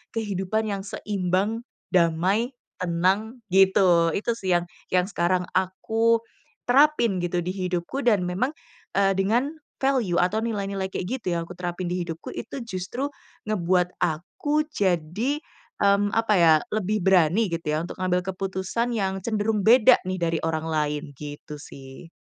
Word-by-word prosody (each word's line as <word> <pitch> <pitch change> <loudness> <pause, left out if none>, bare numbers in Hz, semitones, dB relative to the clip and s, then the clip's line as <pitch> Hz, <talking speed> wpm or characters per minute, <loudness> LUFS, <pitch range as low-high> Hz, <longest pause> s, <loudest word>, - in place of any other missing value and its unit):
kehidupan 215 0 -1
yang 200 -1 -2
seimbang, 205 +3 -1 0.3
damai, 185 +8 +2 0.3
tenang, 190 +7 0
gitu. 185 -4 +5
Itu 230 +3 0
sih 185 -4 0
yang, 175 - -3 0.3
yang 180 0 +4
sekarang 180 -1 +1
aku 225 +5 +1 0.5
terapin 255 -7 +4
gitu 175 0 -1
di 180 - -3
hidupku 185 +7 -2
dan 210 -6 +4
memang, 205 +11 0 0.4
eee, 195 0 +3
dengan 235 +8 +2 0.3
value 250 -10 +2
atau 205 +5 +1
nilai-nilai 200 -3 -2
kayak 180 - -3
gitu 190 - -10
yang - - -1
aku 180 - -10
terapin 175 0 -3
di 180 -1 -2
hidupku 165 0 -7
itu 275 - -6
justru 230 +7 -4 0.4
ngebuat 180 -2 +1
aku 180 - 0
jadi, 200 - 0 0.4
mmm, 200 0 +3
apa 225 -1 +2
ya, 165 -2 +7 0.2
lebih 210 -1 0
berani 190 +2 +4
gitu 165 0 -3
ya 155 - 0
untuk 175 - -7
ngambil 180 -1 +1
keputusan 195 +5 -2
yang 195 -2 -1
cenderung 215 -2 0
beda 245 +2 +7
nih 185 -1 -2
dari 165 -1 +1
orang 160 0 -1
lain, 150 -1 -1
gitu 150 0 -8
sih. 135 +4 -12
190 Hz, 145 wpm, -25 LUFS, 175-220 Hz, 0.5 s, ya